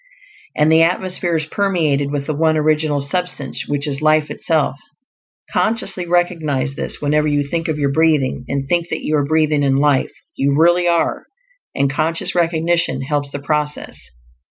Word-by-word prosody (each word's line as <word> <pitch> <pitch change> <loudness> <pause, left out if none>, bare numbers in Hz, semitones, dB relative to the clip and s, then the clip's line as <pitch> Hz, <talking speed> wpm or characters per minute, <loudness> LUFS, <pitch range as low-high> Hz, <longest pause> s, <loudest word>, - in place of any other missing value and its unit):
And 150 +1 +3
the 160 0 +6
atmosphere 180 0 0
is 155 - -2
permeated 155 -6 0
with 145 -1 -3
the 155 - -2
One 155 +1 +2
Original 155 -1 +1
Substance, 180 +6 -3
which 145 0 -2
is 140 0 -3
life 155 -1 +2
itself. 155 -5 0 0.8
Consciously 215 -5 -1
recognize 165 -6 0
this - - -5
whenever 150 +1 +1
you 145 -1 +1
think 165 +2 -2
of 155 -2 -1
your 140 -2 0
breathing, 150 -4 +1
and 140 -1 -3
think 170 +2 0
that - - -3
you 155 - 0
are 145 - +1
breathing 155 -1 +2
in 135 -1 +2
life; 140 -1 +2 0.2
you 140 +1 +1
really 175 +2 +4
are, 170 -1 0 0.5
and 140 - +2
conscious 155 +4 -1
recognition 165 -4 0
helps 145 0 -2
the 140 - -5
process. 150 +1 -3
155 Hz, 165 wpm, -18 LUFS, 145-165 Hz, 0.8 s, the